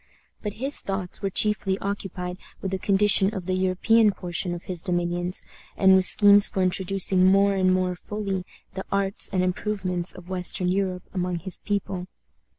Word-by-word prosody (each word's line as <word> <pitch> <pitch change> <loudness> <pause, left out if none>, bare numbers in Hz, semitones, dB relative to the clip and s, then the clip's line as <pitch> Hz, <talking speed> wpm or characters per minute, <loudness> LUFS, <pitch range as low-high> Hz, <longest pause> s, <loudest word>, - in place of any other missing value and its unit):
But 210 -2 -4
his 270 +6 +1
thoughts 195 -1 -4
were 195 - -1
chiefly 200 -1 +2
occupied 190 -2 -5 0.2
with 190 - -4
the 190 - -2
condition 195 0 +3
of 185 -3 -5
the 185 - -2
European 190 +4 +3
portion 180 -1 -4
of 175 - -9
his 180 -3 -2
dominions, 175 0 -1 0.3
and 190 -1 +5
with 190 -1 +4
schemes 205 0 +6
for 190 - -2
introducing 185 0 +1
more 200 +1 +4
and 185 -1 +2
more 185 0 0
fully 195 0 -4 0.3
the 190 0 -5
arts 195 0 +1
and 185 -2 0
improvements 185 -1 -1
of 180 -1 -13
western 180 0 -1
Europe 185 -1 -1
among 180 -1 -2
his 180 +2 -5
people. 195 -3 -3
190 Hz, 165 wpm, -24 LUFS, 180-200 Hz, 0.3 s, schemes